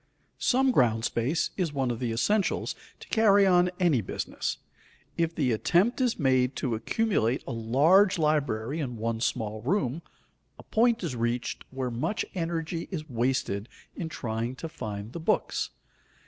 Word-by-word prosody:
Some 265 +1 +3
ground 115 - +3
space 130 +8 0
is 175 -6 -1
one 135 -3 0
of 115 - -4
the 120 -2 -1
essentials 200 - +1 0.3
to - - -11
carry 205 -3 +5
on 180 -1 +4
any 165 -10 +3
business. 95 - -3 0.6
If 165 0 0
the 130 -5 +1
attempt 180 - +2
is 245 -2 +1
made 130 -3 +2
to 130 -4 -1
accumulate 125 - 0
a - - -5
large 150 - +4
library 145 -4 0
in 125 -6 -3
one 115 0 -2
small 110 -3 -1
room, 145 - 0 0.6
a - - -12
point 230 -1 +2
is 155 -8 -2
reached 120 +1 -2
where 130 -1 -3
much 125 - -1
energy 165 -2 -3
is 155 -5 -5
wasted 120 -3 -1 0.3
in 165 -3 -4
trying 115 -2 -3
to 165 - -6
find 110 -8 -6
the - - -5
books. 160 - 0
135 Hz, 155 wpm, -28 LUFS, 115-175 Hz, 0.6 s, carry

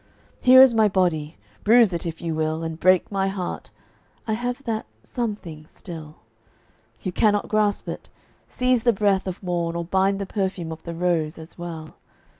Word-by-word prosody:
Here 260 +1 +8
is 260 -3 +5
my 220 -1 +4
body; 170 -5 0 0.3
bruise 225 -3 +5
it, 170 0 -3
if 165 0 -6
you 165 -1 -2
will, 155 +1 -1
And 160 0 -5
break 185 +2 +3
my 195 -1 0
heart; 190 -2 -4 0.6
I 220 - 0
have 245 +4 -3
that 225 -3 -3 0.2
something 205 - -5
still. 160 -4 -10 0.9
You 185 - -2
cannot 205 +2 +1
grasp 210 -1 +1
it. - - -7 0.4
Seize 250 -1 +1
the 235 0 +3
breath 195 -2 +1
of 185 +1 -6
morn 170 -2 -2
Or 170 0 -3
bind 190 +2 +1
the 200 - -3
perfume 190 -4 -3
of 160 - -8
the 170 -1 -7
rose, 165 -2 0
as 160 +1 -11
well. 165 -3 -8
185 Hz, 175 wpm, -23 LUFS, 165-215 Hz, 0.9 s, Here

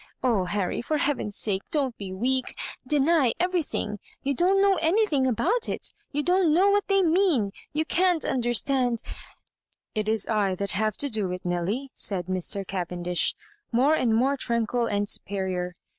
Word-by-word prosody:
Oh, 225 -8 +2
Harry, 185 0 -2
for 305 +6 -1
heaven's 265 -8 -1
sake 195 -3 0
don't 275 -6 -1
be 195 -2 -7
weak 255 +7 0
I - - -5
— - - -27
deny 295 -3 +3
everything; 340 - -1 0.2
you 280 - 0
don*t 370 +8 +3
know 395 -1 +4
anything 325 -5 +2
about 390 - +1
it - - -2
— - - -42
you 295 0 -1
don't 360 -1 +3
know 380 +6 +4
what 410 0 +1
they 390 -1 +3
mean 340 - +3
— - - -2
r 200 - -7 0.2
you 310 +2 -1
can't 355 -1 +2
understand 245 0 +1 0.5
" - - -54
"It 215 -1 -1
is 220 -2 +1
I 205 -4 +1
that 200 +2 -3
have 215 0 -1
to 285 - -2
do 210 -4 0
it, 180 0 -6
Nelly," 190 +10 -2
said 185 -4 0
Mr. 185 +2 -1
Cavendish, 180 -2 0 0.4
more 260 +6 +3
and 235 -7 +2
more 270 +5 +2
tranquil 235 -1 0
and 205 0 -1
superior. 185 -3 -2
245 Hz, 185 wpm, -26 LUFS, 200-315 Hz, 0.5 s, know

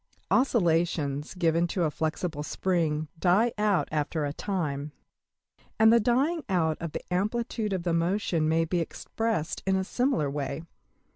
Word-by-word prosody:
Oscillations 165 - +1
given 170 -1 +2
to 175 +1 -1
a 155 - +1
flexible 160 0 -2
spring 155 -1 0
die 205 +7 +3
out 210 -3 +1
after 150 0 -1
a 145 - -3
time; 150 -7 -3 0.8
and 220 +1 +6
the 235 - +6
dying 275 +9 +1
out 160 -4 +2
of 170 -2 -4
the - - -5
amplitude 215 +3 -1
of 185 -3 -1
the 170 -1 0
motion 170 -2 +1
may 165 +1 +2
be 175 +2 0
expressed 210 +1 -2
in 190 - +3
a 190 - +1
similar 245 - 0
way. 140 +1 -3
175 Hz, 150 wpm, -28 LUFS, 155-210 Hz, 0.8 s, and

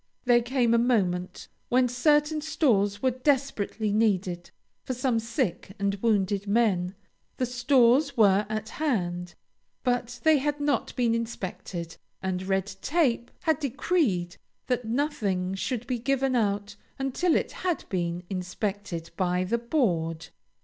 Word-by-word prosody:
There 240 -1 +5
came 240 -1 +1
a 235 - +5
moment 185 -7 0 0.2
when 250 0 +4
certain 295 +5 +2
stores 210 -10 +1
were 260 - +4
desperately 250 -6 0
needed 185 -5 +1 0.3
for 255 - -3
some 250 -2 +1
sick 210 -5 -2
and 200 0 0
wounded 205 -3 +1
men. 200 -4 +2 0.4
The 255 - +1
stores 250 +2 +3
were 205 -1 +4
at 215 0 -3
hand, 180 - -2 0.5
but 245 -1 -1
they 315 -2 +5
had 295 +2 -1
not 290 -1 0
been 240 -3 +2
inspected, 185 -7 -4 0.2
and 185 -1 -2
Red 190 0 0 0.2
Tape 270 -7 +1
had 320 -5 +2
decreed 265 - 0 0.3
that 250 -2 -1
nothing 215 -8 -1
should 235 +4 -3
be 250 -2 -2
given 270 +1 +1
out 205 -3 0 0.2
until 270 +6 +1
it - - 0
had 360 -3 -2
been 175 -1 -2
inspected 190 -1 -4
by 180 -1 +1
the 230 +6 0
board. 170 - 0
230 Hz, 135 wpm, -27 LUFS, 190-260 Hz, 0.5 s, There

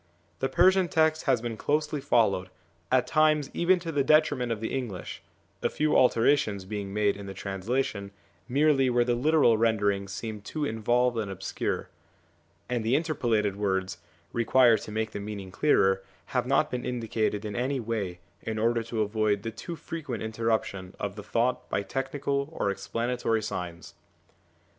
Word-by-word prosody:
The 135 - 0
Persian 185 +6 +4
text 160 -1 +2
has 115 - +2
been 115 -2 -4
closely 150 +3 0
followed, 110 -9 +2 0.4
at 130 -1 +4
times 155 -2 +2
even 180 +2 +3
to 165 -1 -4
the 145 -3 +1
detriment 145 -5 +3
of 115 - -2
the 110 - -4
English, 120 -9 -4 0.4
a - - +1
few 155 0 +1
alterations 115 -5 +3
being 100 0 -5
made 105 0 +1
in 100 0 -8
the 95 - -7
translation 100 +1 -2 0.4
merely 135 0 +3
where 120 0 +3
the 120 - +2
literal 130 -3 +3
rendering 105 -3 +1
seemed 105 +1 -6
too 150 +7 -3
involved 120 0 +1
and 105 -3 -3
obscure; 95 0 -3 0.8
and 120 -2 -1
the 115 +4 +2
interpolated 120 - 0
words, 95 -3 -1 0.3
required 120 0 +4
to - - -8
make 110 +1 -2
the - - -5
meaning 100 -2 -6
clearer, 95 -6 +3 0.3
have 125 -1 +1
not 140 +3 +2
been 125 -1 -3
indicated 110 -3 -1
in 105 -1 -4
any 130 +3 -1
way 105 -7 -3 0.2
in 110 -1 -4
order 115 +2 +2
to 115 -1 -1
avoid 105 -1 0
the 115 - -3
too 170 +10 -7
frequent 155 -9 -5
interruption 110 -4 -2
of 100 -1 -3
the 105 - -7
thought 120 +4 -1
by 100 - 0
technical 140 +4 -2
or 100 -10 -1
explanatory 115 +3 -1
signs. 85 -5 -5
115 Hz, 160 wpm, -28 LUFS, 105-135 Hz, 0.8 s, Persian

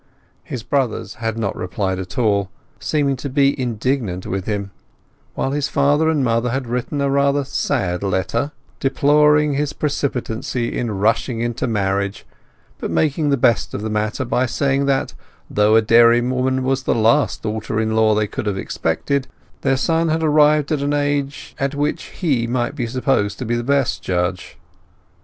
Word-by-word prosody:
His 120 -4 -6
brothers 135 -4 -1
had 115 -1 -2
not 110 -4 -2
replied 95 +1 -2
at 95 -1 -7
all, 100 -5 +1 0.3
seeming 145 -3 0
to 140 - -5
be 140 +1 +3
indignant 115 -5 -2
with 95 0 -3
him; 100 -2 -2 0.6
while 135 - -1
his 145 0 0
father 145 +2 +2
and 150 -4 +1
mother 115 0 +1
had 130 +2 -2
written 125 +4 -2
a 140 - +1
rather 140 +1 +2
sad 120 -9 -1
letter, 95 +8 -1 0.3
deploring 150 +2 +3
his 145 +1 -1
precipitancy 125 -5 -2
in 120 - -1
rushing 110 +4 0
into 120 +1 -2
marriage, 100 -2 -1 0.5
but - - -3
making 150 0 +1
the 140 - +2
best 120 -2 +2
of 105 - -4
the 110 - -3
matter 110 +5 -1
by 125 +2 +1
saying 140 +3 0
that, 135 -1 0 0.4
though 105 +1 +4
a 110 - +5
dairywoman 120 +3 +4
was 135 0 0
the - - 0
last 115 +6 +2
daughter 110 0 -2
in 110 0 0
law 110 -1 +4
they 105 0 +2
could 105 0 -5
have 100 -2 -1
expected, 130 - -1 0.3
their 135 - +2
son 165 +4 +1
had 160 +1 0
arrived 150 -1 +4
at 150 -3 0
an 145 +1 0
age 145 -1 -2 0.2
which 145 +1 -1
he 135 -10 -1
might 120 +1 -1
be 125 -6 -3
supposed 115 -4 0
to 130 - -5
be 115 - -1
the 120 - -2
best 140 0 +1
judge. 90 -1 -2
125 Hz, 170 wpm, -20 LUFS, 110-140 Hz, 0.6 s, a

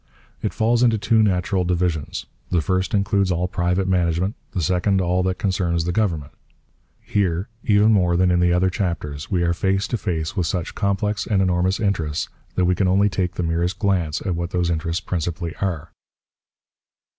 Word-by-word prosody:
It - - -1
falls 115 +2 +1
into 115 -3 +4
two 110 +2 +3
natural 95 -2 +1
divisions: 85 -4 -1 0.2
the 90 - +2
first 95 +6 0
includes 100 -1 +1
all 90 +1 0
private 90 +1 0
management, 90 +1 +1 0.2
the 95 - -3
second 95 +4 +2
all 90 0 +1
that 95 0 -1
concerns 90 -4 0
the 90 - 0
government. 85 -8 -1 0.7
Here, 95 -1 -1
even 105 +1 +4
more 90 -4 +3
than 90 0 +3
in 90 - +3
the 90 0 +3
other 90 +1 +2
chapters, 80 -7 -3
we 90 -3 +1
are 85 0 +2
face 95 +2 0
to 120 - -1
face 80 -3 -2
with 90 -5 0
such 90 -3 -3
complex 100 0 -1
and 105 -3 +2
enormous 95 +1 +1
interests 85 -8 -1 0.3
that 90 - +2
we 90 - +3
can 95 +1 +1
only 100 +3 +3
take 90 -1 -2
the 90 - -2
merest 85 +3 0
glance 95 -6 0
at 95 - 0
what 85 0 -3
those 90 -1 0
interests 85 +2 -2
principally 85 -1 -3
are. 90 -6 -3
90 Hz, 180 wpm, -22 LUFS, 85-100 Hz, 0.7 s, into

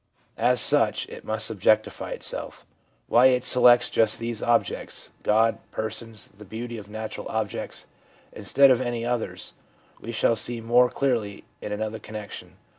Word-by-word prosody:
As 125 0 +3
such - - +4
it - - -10
must 110 0 0
objectify 110 +1 +1
itself. - - -5 0.4
Why 125 +2 +6
it 125 -1 +2
selects 120 -1 +6
just 110 - +3
these 115 -1 -4
objects 120 0 -1
— - - -36
God, 110 +1 +2
persons, 110 0 -5
the 105 - -13
beauty 115 +3 -7
of 105 0 -13
natural 110 +1 -6
objects 110 -2 -4 0.2
— - - -30
instead 135 +7 +4
of 125 -1 +3
any 120 -2 -3
others, 120 -1 -3 0.5
we 115 - -6
shall 115 0 +2
see 120 +2 -3
more 120 +2 +3
clearly 115 -8 -2 0.2
in - - -6
another 110 +1 -3
connection. 105 -1 -9
115 Hz, 155 wpm, -25 LUFS, 110-120 Hz, 0.5 s, Why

